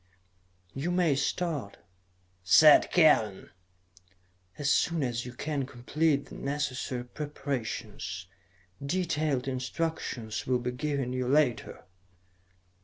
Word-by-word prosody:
"You 140 +6 -3
may 175 -4 +2
start," 140 - -2 0.7
said 150 - +7
Kellen, 130 - +3 1.1
"as 145 0 +1
soon 165 -4 +2
as 120 -1 -2
you 125 - -8
can 140 0 -3
complete 145 +3 0
the - - -14
necessary 130 -3 -3
preparations. 120 -10 -5 0.6
Detailed 155 -4 -1
instructions 130 -4 -3
will 125 -1 +3
be 125 0 -3
given 135 -1 -2
you 130 -1 -2
later." 135 -3 +1
140 Hz, 100 wpm, -29 LUFS, 125-150 Hz, 1.1 s, said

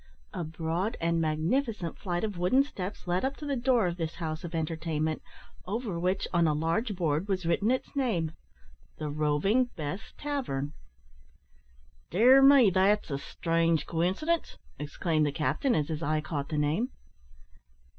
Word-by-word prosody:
A - - -3
broad 165 +7 -2
and 165 0 +1
magnificent 170 - 0
flight 175 -2 -3
of 210 -3 -2
wooden 180 +11 +3
steps 200 -8 -6
led 180 +1 0
up 270 +1 -1
to 300 - -7
the 285 -1 -1
door 245 -3 +2
of 175 -1 -2
this 165 -2 -3
house 160 -1 -4
of 170 -1 -5
entertainment, 160 -1 -1 0.5
over 205 -3 -2
which, 185 +2 0
on 170 -2 +4
a 150 - +2
large 165 +8 0
board, 165 0 0
was 190 -3 -1
written 170 +6 +2
its 260 +3 -1
name 205 - 0 0.7
"The 150 -1 -4
Roving 155 - +2
Bess 155 +6 -5
Tavern." 200 - -3 1.4
"Dear 250 +9 +6
me! 270 -6 +7
that's 195 0 +2
a 140 - -1
strange 165 +1 0
coincidence," 190 - -1 0.2
exclaimed 155 +1 0
the - - 0
captain, 155 - 0
as 150 0 0
his 160 0 -3
eye 155 -1 +1
caught 150 -2 -4
the 155 - -2
name. 155 - +1
170 Hz, 155 wpm, -29 LUFS, 155-220 Hz, 1.4 s, me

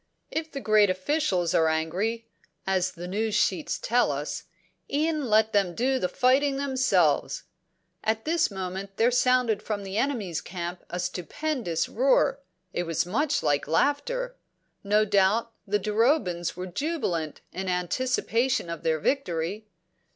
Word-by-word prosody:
If 320 0 -3
the 275 - -4
great 215 -4 +4
officials 185 - 0
are 160 - +4
angry, 180 +9 -1 0.4
as 185 -1 +1
the 175 +1 -7
news 210 +3 -1
sheets 185 -6 +1
tell 240 -9 +2
us, 145 +2 -4 0.5
e'en 305 0 0
let 220 +1 +4
them 195 -4 +2
do 260 +2 +1
the 180 - 0
fighting 270 +6 +3
themselves." 275 - +1 0.6
At 220 0 0
this 335 +2 +2
moment 190 0 -5
there 235 +2 +4
sounded 250 -3 +3
from 210 -2 -3
the 195 +1 -4
enemy's 215 - -1
camp 175 0 -6
a 180 - -4
stupendous 180 - -2
roar; 270 +3 +2 0.3
it 175 - -1
was 165 0 0
much 285 - 0
like 145 -1 +1
laughter; 485 - 0 0.5
no 210 +1 +3
doubt 205 +4 +2 0.2
the 205 +1 +2
Durobans 210 - +1
were 180 - -4
jubilant 180 - -2
in 190 0 -3
anticipation 235 +3 0
of 170 - -5
their 160 -1 +1
victory. 195 - -1
210 Hz, 140 wpm, -27 LUFS, 180-260 Hz, 0.6 s, great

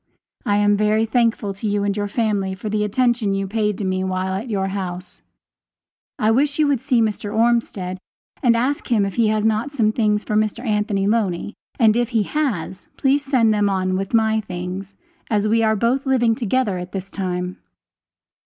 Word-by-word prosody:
I 205 0 +3
am 205 0 +3
very 215 +1 +2
thankful 225 -3 +1
to 195 +3 -4
you 205 0 0
and 200 -1 0
your 205 -1 -1
family 205 -3 -1
for 205 +3 -5
the 210 0 0
attention 230 -1 +1
you 195 0 -1
paid 210 0 -1
to - - -4
me 185 0 -1
while 190 0 -2
at 210 +6 -4
your 195 -3 -1
house. 185 -2 -5 1.0
I 215 +1 +2
wish 285 +5 +2
you 310 - +3
would 280 -5 +1
see 235 -3 +2
Mr. 210 -1 -2
Ormsted 220 -5 0 0.4
and 235 -3 +4
ask 265 +5 -1
him 210 -4 +3
if 195 - -4
he 230 -2 +2
has 215 0 +1
not 220 +6 0
some 220 -6 +2
things 210 -2 +1
for 210 - -2
Mr. 215 +3 0
Anthony 210 -2 0
Loney, 205 -2 0 0.3
and 220 -3 +5
if 240 -1 +1
he 225 -4 +1
has, 205 - -3
please 280 +1 +2
send 250 -6 +3
them 205 -1 +2
on 185 -1 0
with 195 +4 -1
my 220 -1 +2
things, 185 +1 -6 0.3
as 210 -1 +1
we 225 +2 +3
are 220 -1 +3
both 245 +6 0
living 240 -4 +3
together 230 -4 0
at 180 0 -8
this 195 0 -5
time. 180 -1 -3
215 Hz, 195 wpm, -21 LUFS, 195-230 Hz, 1.0 s, and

